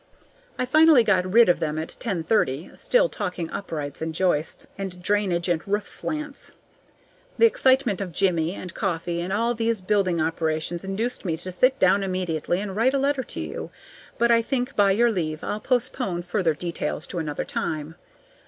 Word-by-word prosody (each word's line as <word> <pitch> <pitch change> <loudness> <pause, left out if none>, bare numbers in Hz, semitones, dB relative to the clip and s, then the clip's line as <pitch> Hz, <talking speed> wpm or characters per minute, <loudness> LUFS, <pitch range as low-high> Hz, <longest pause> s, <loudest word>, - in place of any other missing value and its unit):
I 255 - 0
finally 305 -1 +6
got 185 -4 +2
rid 235 +3 +7
of 175 - +3
them 155 -1 -2
at 160 - -4
ten 195 -9 -2
thirty, 160 -6 0
still - - +2
talking 180 - -4
uprights 150 -7 -5
and 160 0 -3
joists 170 -4 0
and 190 -2 -6
drainage 185 -2 0
and 170 -3 +1
roof 205 +1 -1
slants. 300 -2 -4 0.9
The - - +6
excitement 260 - +3
of 185 -3 -4
Jimmie 170 -1 +1
and 180 -2 -8
coffee 170 -3 -2
and 180 +2 -4
all 230 +4 +1
these 230 -1 0
building 185 -3 +1
operations 160 +1 -1
induced 210 +6 -3
me 165 -5 -1
to 185 +3 -7
sit 255 +9 +3
down 190 -1 +4
immediately 180 -3 -1
and 200 -2 -5
write 250 +6 +2
a - - +3
letter 275 0 +1
to - - -8
you; - - -5 0.5
but 235 0 +3
I 230 0 +5
think, 250 +2 -2
by 200 -1 +4
your 230 +4 +3
leave, 155 -6 -3
I'll 210 - -2
postpone 245 -7 -1
further 175 -3 0
details 170 +2 -3
to 175 - -5
another 150 -2 -3
time. 155 0 -3
190 Hz, 180 wpm, -24 LUFS, 170-230 Hz, 0.9 s, rid